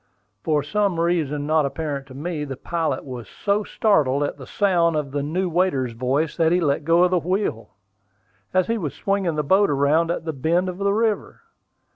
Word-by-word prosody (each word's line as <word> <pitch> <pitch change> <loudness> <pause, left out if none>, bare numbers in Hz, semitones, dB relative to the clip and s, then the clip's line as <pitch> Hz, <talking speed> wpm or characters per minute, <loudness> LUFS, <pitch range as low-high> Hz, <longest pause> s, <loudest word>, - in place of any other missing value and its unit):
For 150 -2 +1
some 200 +1 0
reason 155 -4 0
not 155 0 +2
apparent 140 -1 -3
to 130 - -12
me, 155 +1 -4
the 135 -3 -6
pilot 160 -5 -2
was 125 -4 -8
so 205 +1 -1
startled 145 -12 +2
at 145 - -2
the 135 -3 -11
sound 175 -5 +2
of 150 -3 -2
the 145 +1 -1
new 175 +6 -1
waiter's 165 -8 0
voice 130 +6 -1
that 165 -1 +3
he 175 - +3
let 145 -3 0
go 170 +3 +4
the 180 0 +1
wheel, 170 - -2 0.8
as 185 -1 +2
he 230 0 -1
was 150 -7 -4
swinging 195 -5 -1
the 150 - 0
boat 190 +7 +3
around 145 +4 +2
at 170 -1 -3
a 160 - -1
bend 170 +7 0
of 180 +1 -7
the 200 0 +1
river. 220 0 -1
160 Hz, 195 wpm, -23 LUFS, 145-185 Hz, 0.8 s, go